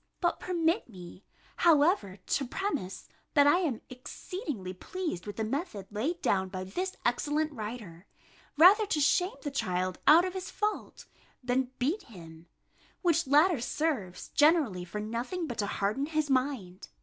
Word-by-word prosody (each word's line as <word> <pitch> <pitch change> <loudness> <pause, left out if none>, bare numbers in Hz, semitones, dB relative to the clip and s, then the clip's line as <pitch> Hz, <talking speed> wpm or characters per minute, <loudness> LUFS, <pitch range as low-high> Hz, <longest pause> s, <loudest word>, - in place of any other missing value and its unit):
But 345 -1 0
permit 340 - 0
me, 180 -1 -12 0.3
however, 300 - +3
to 250 +7 -2
premise, 285 - -3 0.3
that 285 -1 +6
I 290 +5 +5
am 295 -11 -1
exceedingly 255 - -6
pleased 315 - -5
with 205 - -5
the 220 - -2
method 230 - -3
laid 275 +12 -2
down 190 -1 +1
by 185 0 -5
this 365 - -4
excellent 295 +6 0
writer, 210 -7 -7 0.5
rather 400 +7 +7
to 315 - 0
shame 360 - +2
the 290 - -3
child 185 -7 -2
out 330 +4 +8
of 370 - -3
his 375 -1 -5
fault, 425 0 -3 0.4
than 250 +1 0
beat 300 +12 0
him; 165 -6 -13 0.6
which 335 -3 +2
latter 300 +1 +4
serves 245 - -2
generally 290 - +3
for 210 +4 -6
nothing 235 - -3
but 240 -7 -6
to 205 - 0
harden 210 +9 -1
his 310 -2 -1
mind. 255 -9 -1
270 Hz, 150 wpm, -30 LUFS, 200-335 Hz, 0.6 s, out